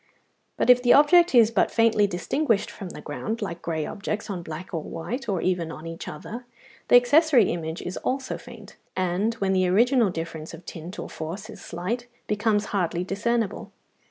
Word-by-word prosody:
But - - +5
if 250 0 +5
the 245 -1 +5
object 340 +2 +6
is 230 -2 +6
but - - +2
faintly 225 -3 +3
distinguished 205 - 0
from 195 -4 -8
the - - -9
ground, 220 +10 -4
like 175 -6 -5
grey 160 -2 -2
objects 205 +1 -4
on 180 -3 -4
black 165 +2 -8
or 165 - -1
white, 225 - -5
or 190 -4 0
even 175 -3 0
on 155 0 -9
each 165 0 -7
other, 235 +11 -7 0.4
the - - +6
accessory 250 - +5
image 165 0 -4
is 180 - -5
also 265 0 -2
faint, - - -13 0.2
and, 185 +5 0
when 195 -4 0
the 185 -1 +2
original 235 +4 +4
difference 165 -2 -6
of 170 +1 -15
tint 170 +4 -8
or - - -5
force 190 +8 -6
is - - -12
slight, 210 +9 -4 0.2
becomes 210 0 +1
hardly 175 -3 0
discernible. 215 +2 -2
200 Hz, 185 wpm, -25 LUFS, 170-235 Hz, 0.4 s, object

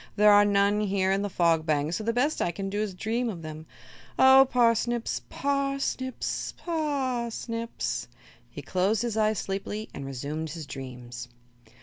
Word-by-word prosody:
There 210 0 +6
are 205 0 +7
none 200 0 +3
here 190 -2 +1
in 195 +1 +1
the 205 - -2
Fog 170 -3 +2
Bank, 155 0 0
so 215 - -2
the 230 - +1
best 255 +6 0
I - - +1
can 195 +3 -4
do 205 +1 -1
is 205 -4 -3
dream 230 +5 -1
of 175 -6 -6
them. 155 0 -8 0.5
Oh, 265 0 +8
parsnips 240 -1 +1
par 275 0 0
snips 260 -1 -3
p - - -22
a 345 - -2
r 270 -6 -1
snips!" 230 0 -4 0.4
He - - -9
closed 195 +5 +1
his 235 -3 -2
eyes 215 -1 +2
sleepily 200 +2 -4
and 140 - -6
resumed 145 +4 -4
his 155 0 -6
dreams. 125 -3 -8
205 Hz, 180 wpm, -27 LUFS, 170-240 Hz, 0.5 s, Oh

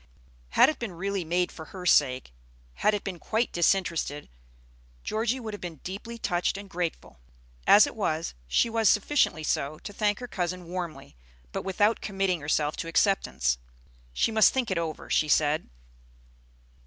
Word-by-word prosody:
Had - - +8
it 310 - -2
been 230 -6 -4
really 195 +2 -2
made 175 +2 0
for 160 - -9
her 185 -2 -9
sake, 130 - +3 0.4
had 210 - +2
it 205 - -4
been 185 -3 -5
quite 225 +6 -1
disinterested, 170 -4 0 0.7
Georgie 230 +4 -1
would 220 -3 -6
have 205 - -7
been 175 -2 -6
deeply 210 +5 -6
touched 180 -3 0
and 200 0 -8
grateful; 175 - -4 0.5
as 210 - +8
it - - -7
was, 165 -7 -1
she 150 - +3
was 225 -2 +2
sufficiently 210 - +2
so 150 0 -1
to 205 - -9
thank 205 -1 +1
her 250 - -7
cousin 180 -4 -3
warmly, 170 - -6 0.4
but - - -3
without 205 +4 +1
committing 195 -4 -1
herself 150 0 0
to - - -4
acceptance. 110 - +1 0.5
She 65 - +1
must 220 -1 +6
think 255 -6 -1
it 180 - +1
over, 160 -2 -4
she 155 - +2
said. 150 - +2
185 Hz, 165 wpm, -27 LUFS, 160-210 Hz, 0.7 s, Had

